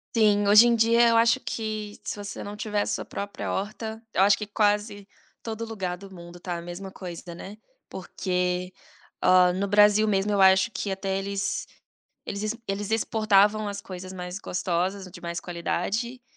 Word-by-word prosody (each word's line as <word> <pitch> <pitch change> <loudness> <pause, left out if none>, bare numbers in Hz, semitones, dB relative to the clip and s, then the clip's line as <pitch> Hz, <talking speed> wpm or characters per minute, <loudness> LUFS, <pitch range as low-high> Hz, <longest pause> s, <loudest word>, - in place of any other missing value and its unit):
Sim, 205 -2 +4
hoje 215 +4 +8
em 235 - +4
dia, 230 +1 +4
eu 230 - +4
acho 230 0 +4
que 215 -2 -4
se - - -4
você 205 -1 -7
não 205 +1 -7
tiver 210 -1 -1
a - - -5
sua - - -2
própria 200 0 -5
horta, 220 +2 -4
eu - - +2
acho 200 +1 +5
que 210 - -4
quase 205 -1 0 0.3
todo 225 0 -5
lugar 190 -5 -4
do 195 +1 -12
mundo 175 -1 -11
está 175 0 -5
a 170 - -5
mesma 175 +3 -8
coisa, 175 -2 -8
né, 195 +4 -9 0.3
porque, 180 -1 -2 0.5
ó, 180 -1 +6
no 195 +2 -1
Brasil 210 +1 +5
mesmo, 200 0 +1
eu 200 - +1
acho 190 +2 +6
que 195 0 -3
até 195 0 -2
eles 200 0 -2 0.6
eles 200 - -5
ex 215 +2 -2
eles 205 +2 -3
exportavam 215 -1 +3
as 200 0 -4
coisas 185 -1 -8
mais 180 0 -6
gostosas, 185 0 -2
de - - -12
mais 170 0 -4
qualidade, 200 +8 -3
200 Hz, 180 wpm, -26 LUFS, 185-215 Hz, 0.6 s, hoje